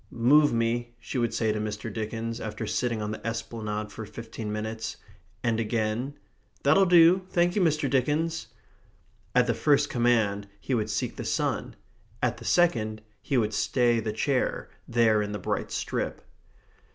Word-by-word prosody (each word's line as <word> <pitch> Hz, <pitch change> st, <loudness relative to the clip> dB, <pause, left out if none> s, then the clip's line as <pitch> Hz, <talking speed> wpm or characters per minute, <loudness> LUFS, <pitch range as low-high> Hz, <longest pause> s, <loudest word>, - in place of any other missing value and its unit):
"Move 145 Hz, +6 st, +4 dB
me," 120 Hz, +1 st, -1 dB
she 125 Hz, -, -4 dB
would 120 Hz, -1 st, +1 dB
say 110 Hz, -1 st, +1 dB
to 105 Hz, -, -2 dB
Mr. 105 Hz, 0 st, -4 dB
Dickens, 115 Hz, +2 st, -3 dB
after 105 Hz, -1 st, -4 dB
sitting 115 Hz, -3 st, -1 dB
on 105 Hz, -, -3 dB
the 110 Hz, -, -6 dB
esplanade 110 Hz, -2 st, -4 dB
for 110 Hz, -, -7 dB
fifteen 110 Hz, 0 st, -7 dB
minutes. 110 Hz, +1 st, -4 dB, 0.5 s
And 115 Hz, -2 st, +1 dB
again, 115 Hz, +5 st, -1 dB, 0.5 s
"That'll 170 Hz, +8 st, +5 dB
do, 175 Hz, +2 st, +6 dB
thank 175 Hz, 0 st, +2 dB
you, 205 Hz, -, +2 dB
Mr. 155 Hz, -4 st, +2 dB
Dickens." 150 Hz, +5 st, 0 dB, 0.9 s
At 125 Hz, -1 st, +5 dB
the 120 Hz, -, +1 dB
first 145 Hz, +4 st, +2 dB
command 110 Hz, -4 st, +2 dB
he 130 Hz, -, -3 dB
would 110 Hz, -3 st, 0 dB
seek 105 Hz, -, -2 dB
the -, -, -4 dB
sun; -, -, -1 dB, 0.4 s
at -, -, 0 dB
the -, -, -11 dB
second 110 Hz, -11 st, +2 dB, 0.2 s
he 135 Hz, -, 0 dB
would 110 Hz, -2 st, +1 dB
stay 120 Hz, +2 st, +2 dB
the 110 Hz, -1 st, -2 dB
chair 130 Hz, +4 st, -1 dB, 0.2 s
there 115 Hz, -3 st, +3 dB
in 105 Hz, 0 st, -3 dB
the -, -, -2 dB
bright 90 Hz, -, -2 dB
strip. -, -, -3 dB
115 Hz, 165 wpm, -27 LUFS, 110-135 Hz, 0.9 s, do